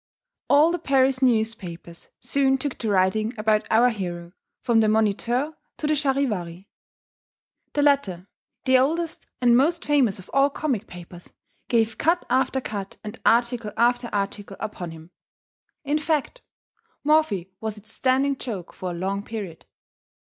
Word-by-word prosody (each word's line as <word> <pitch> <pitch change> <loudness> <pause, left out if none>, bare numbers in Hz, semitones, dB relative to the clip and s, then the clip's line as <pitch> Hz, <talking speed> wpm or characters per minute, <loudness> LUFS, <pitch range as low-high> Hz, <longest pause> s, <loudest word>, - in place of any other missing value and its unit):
All 300 +4 +6
the 350 - -2
Paris 270 -3 +2
newspapers 220 -9 -1
soon 270 -1 +2
took 270 0 -3
to 225 - -2
writing 210 +4 +1
about 215 0 +1
our 240 +3 +5
hero, 175 -5 -5 0.3
from 235 -2 +3
the 220 - +4
Moniteur 220 +7 +1 0.2
to - - -4
the 305 - +2
Charivari. 225 - -1 1.1
The 290 - +1
latter, 205 -11 +1 0.4
the 260 -1 +5
oldest 325 +5 -1
and 240 -1 +5
most 320 +7 +2
famous 275 -9 +2
of 185 - -13
all 275 +1 +4
comic 265 -7 -2
papers, 175 0 -12 0.4
gave 225 -2 +1
cut 340 +3 +2
after 265 +1 +2
cut 200 -6 -6
and 215 +2 -8
article 235 -2 +2
after 240 0 +2
article 200 0 -3
upon 180 -5 -5
him; 160 +1 -12 0.7
in 295 +1 0
fact, 310 - -1 0.6
Morphy 285 - +2
was 220 -1 -4
its 210 +2 -11
standing 270 +2 +2
joke 210 -10 -6
for 185 - -5
a 175 - -4
long 195 +3 -2
period. 205 -6 -7
230 Hz, 145 wpm, -24 LUFS, 200-275 Hz, 1.1 s, All